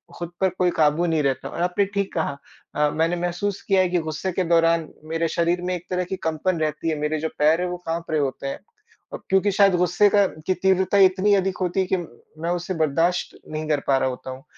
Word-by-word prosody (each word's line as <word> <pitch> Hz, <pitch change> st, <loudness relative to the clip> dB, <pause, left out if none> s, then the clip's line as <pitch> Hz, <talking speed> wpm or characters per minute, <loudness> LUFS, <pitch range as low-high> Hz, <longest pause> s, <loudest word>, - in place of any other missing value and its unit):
खुद 175 Hz, 0 st, -6 dB
पर 190 Hz, -, +4 dB
कोई 180 Hz, -1 st, +3 dB
काबू 155 Hz, +2 st, +3 dB
नहीं 160 Hz, -3 st, +1 dB
रहता 135 Hz, -2 st, -1 dB
और -, -, -5 dB
आपने 180 Hz, +3 st, +1 dB
ठीक 200 Hz, 0 st, -3 dB
कहा 155 Hz, -4 st, -2 dB, 0.4 s
अ, 150 Hz, 0 st, +2 dB
मैंने 165 Hz, +2 st, +1 dB
महसूस 175 Hz, +3 st, -2 dB
किया 195 Hz, -2 st, +2 dB
है 185 Hz, -, +1 dB
कि 175 Hz, -1 st, +1 dB
गुस्से 155 Hz, +5 st, -3 dB
के 185 Hz, +1 st, -1 dB
दौरान 165 Hz, -1 st, +3 dB, 0.2 s
मेरे 165 Hz, +1 st, -1 dB
शरीर 170 Hz, +2 st, 0 dB
में 180 Hz, 0 st, -2 dB
एक 175 Hz, 0 st, -8 dB
तरह 180 Hz, 0 st, 0 dB
की 190 Hz, -, -4 dB
कंपन 165 Hz, +2 st, -1 dB
रहती 155 Hz, +1 st, -1 dB
है, 160 Hz, -, 0 dB
मेरे 150 Hz, +1 st, -1 dB
जो 160 Hz, +1 st, -2 dB
पैर 155 Hz, +4 st, +4 dB
है 180 Hz, -, 0 dB
वो 180 Hz, -, -4 dB
काँप 165 Hz, 0 st, -3 dB
रहें 155 Hz, -, +2 dB
होते 140 Hz, 0 st, -3 dB
हैं। 135 Hz, -, -4 dB, 0.5 s
और -, -, -7 dB
क्योंकि 195 Hz, +2 st, +3 dB
शायद 195 Hz, -1 st, +4 dB
गुस्से 180 Hz, +3 st, +3 dB
का 200 Hz, 0 st, +4 dB, 0.2 s
की 185 Hz, -, +3 dB
तीव्रता 190 Hz, +1 st, +2 dB
इतनी 190 Hz, +2 st, +4 dB
अधिक 190 Hz, -1 st, 0 dB
होती 180 Hz, +1 st, 0 dB
है -, -, 0 dB
कि 190 Hz, -, +3 dB
मैं 165 Hz, +1 st, -8 dB
उसे 175 Hz, +1 st, -2 dB
बर्दाश्त 165 Hz, +3 st, 0 dB
नहीं 155 Hz, 0 st, -4 dB
कर 150 Hz, -2 st, +2 dB
पा 135 Hz, -, +4 dB
रहा 130 Hz, -, +1 dB
होता 125 Hz, 0 st, -7 dB
हूँ 130 Hz, +2 st, -10 dB
175 Hz, 240 wpm, -23 LUFS, 155-185 Hz, 0.5 s, पर